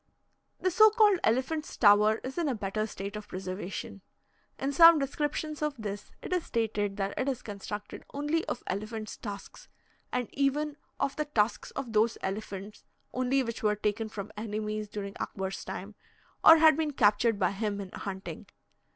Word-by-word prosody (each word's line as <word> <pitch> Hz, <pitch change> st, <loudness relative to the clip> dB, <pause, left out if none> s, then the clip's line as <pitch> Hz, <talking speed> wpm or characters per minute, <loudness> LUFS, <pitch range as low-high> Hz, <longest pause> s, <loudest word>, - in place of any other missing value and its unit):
The 370 Hz, -, +1 dB
so 435 Hz, +5 st, +8 dB
called 420 Hz, -4 st, +4 dB
Elephant's 265 Hz, +7 st, 0 dB
Tower 210 Hz, 0 st, +6 dB
is 265 Hz, +6 st, -4 dB
in 335 Hz, -, +1 dB
a 260 Hz, -, 0 dB
better 215 Hz, +1 st, -2 dB
state 200 Hz, 0 st, -6 dB
of 210 Hz, 0 st, -7 dB
preservation. 185 Hz, +1 st, -5 dB, 0.6 s
In 270 Hz, +1 st, -1 dB
some 330 Hz, +2 st, +9 dB
descriptions 295 Hz, +2 st, -2 dB
of 300 Hz, -1 st, 0 dB
this, 205 Hz, -2 st, -6 dB
it -, -, -3 dB
is 360 Hz, -2 st, +1 dB
stated 210 Hz, -3 st, -1 dB
that 195 Hz, 0 st, -1 dB
it 265 Hz, -, +1 dB
is 255 Hz, -2 st, -3 dB
constructed 205 Hz, 0 st, -7 dB
only 295 Hz, +3 st, 0 dB
of 245 Hz, -, -4 dB
elephants' 215 Hz, +2 st, -4 dB
tusks, 205 Hz, -, -8 dB, 0.4 s
and 250 Hz, -2 st, -1 dB
even 285 Hz, +2 st, 0 dB, 0.2 s
of 275 Hz, 0 st, 0 dB
the 300 Hz, -, 0 dB
tusks 230 Hz, -7 st, 0 dB
of 255 Hz, -5 st, -4 dB
those 220 Hz, +2 st, +3 dB
elephants 200 Hz, +1 st, -5 dB, 0.3 s
only 255 Hz, +1 st, +1 dB
which 230 Hz, 0 st, -5 dB
were 210 Hz, -2 st, +2 dB
taken 210 Hz, +2 st, -1 dB
from 210 Hz, -1 st, -7 dB
enemies 215 Hz, 0 st, -3 dB
during 200 Hz, -1 st, -5 dB
Akbar's 190 Hz, 0 st, -4 dB
time, -, -, -6 dB, 0.5 s
or 325 Hz, -, +10 dB
had 315 Hz, -1 st, +7 dB
been 305 Hz, -1 st, -1 dB
captured 225 Hz, -1 st, +3 dB
by 185 Hz, -2 st, +2 dB
him 205 Hz, 0 st, -2 dB
in 195 Hz, -2 st, -7 dB
hunting. 190 Hz, -1 st, -6 dB
220 Hz, 170 wpm, -29 LUFS, 205-280 Hz, 0.6 s, or